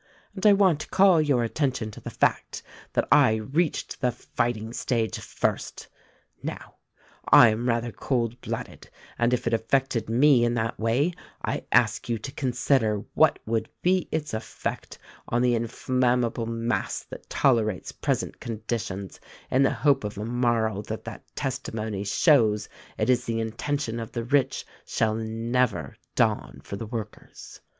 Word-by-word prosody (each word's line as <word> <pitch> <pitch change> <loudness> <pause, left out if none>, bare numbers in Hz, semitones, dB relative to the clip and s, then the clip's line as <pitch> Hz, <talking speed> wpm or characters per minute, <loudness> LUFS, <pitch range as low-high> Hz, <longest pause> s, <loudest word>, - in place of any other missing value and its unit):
And 200 +1 +1
I 205 - +8
want 190 -6 +4
to - - -7
call 190 -3 +5
your 140 -5 +2
attention 125 -3 -1
to - - -11
the - - -6
fact - - 0 0.3
that - - +1
I 110 - +6
reached 140 +11 -1
the 125 -2 +2
fighting 115 -2 -3
stage 115 -3 -1
first. - - -3 0.5
Now, - - -7 0.5
I 120 - +9
am 115 +3 -1
rather 120 0 0
cool 120 -1 -1
blooded, - - -6 0.3
and 120 0 +3
if 125 - 0
it 115 - 0
affected 115 0 0
me 125 +1 +5
in 120 0 +1
that 115 0 -2
way 125 +10 +1 0.3
I - - -3
ask - - +2
you 115 - +1
to 120 +5 -7
consider 120 -5 +1
what - - +4
would 110 0 -1
be 185 0 +2
its 155 -4 -2
effect 110 0 -5 0.3
on 120 +1 +1
the 125 -1 +3
inflammable 120 0 0
mass 115 +1 -2
that - - -11
tolerates 110 -7 +1
present - - -2
conditions 110 -4 -4 0.3
in 130 - +3
the 135 - +5
hope 140 -4 +2
of 105 -1 -5
a 105 - -3
morrow 115 -3 +1
that - - -6
that - - -8
testimony 110 -6 -3
shows 110 - +3 0.3
it 110 - 0
is 125 -1 +2
the 115 -1 -1
intention 115 +2 -2
of 115 - -7
the 120 - -2
rich 135 +1 +1 0.2
shall 110 -1 0
never 115 - -1 0.2
dawn - - +1
for - - -6
the 110 +2 -6
workers. 110 -2 -8
120 Hz, 155 wpm, -26 LUFS, 110-130 Hz, 0.5 s, I